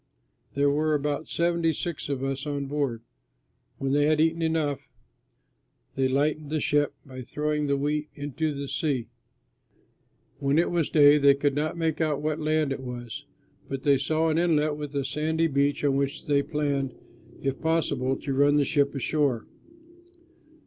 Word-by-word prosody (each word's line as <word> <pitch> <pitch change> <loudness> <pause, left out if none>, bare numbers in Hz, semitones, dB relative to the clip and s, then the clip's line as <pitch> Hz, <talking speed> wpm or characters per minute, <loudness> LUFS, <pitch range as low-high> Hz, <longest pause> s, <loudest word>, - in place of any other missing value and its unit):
There 140 0 +3
were 155 +1 +1
about 145 +1 -2
seventy 170 -1 +1
six 165 -1 -4
of 135 -2 -2
us 135 +2 -3
on 145 -1 -2
board. 135 -5 -2 0.7
When 135 0 -2
they 145 +1 +3
had 155 0 +2
eaten 165 +1 +2
enough, 160 -4 -1 1.0
they 135 -1 +1
lightened 145 +3 0
the 155 0 0
ship 145 0 +1
by 130 -2 -9
throwing 150 +4 -2
the 140 0 +1
wheat 150 +2 -1
into 145 +2 -2
the 140 -1 -5
sea. 130 -6 -1 1.3
When 140 +1 +1
it 170 - +2
was 170 -3 0
day 145 -1 +6
they 140 -1 +6
could 140 0 +1
not 155 +4 -2
make 160 -1 -1
out 155 -3 +1
what 155 +1 -2
land 155 -2 +1
it 135 - -2
was; 120 -3 -7 0.4
but 135 -1 -4
they 140 -2 +4
saw 160 +3 +1
an 160 +1 +1
inlet 155 -3 +2
with 150 -1 -7
a 140 -1 0
sandy 160 +3 0
beach 140 -2 +1
on 140 -2 +2
which 140 0 -2
they 145 -1 +3
planned, 140 -3 -2 0.4
if 135 -1 -3
possible, 145 -5 +1
to 140 - -2
run 145 +2 +4
the 145 -1 +3
ship 140 0 +1
ashore. 135 -3 0
145 Hz, 170 wpm, -26 LUFS, 140-155 Hz, 1.3 s, day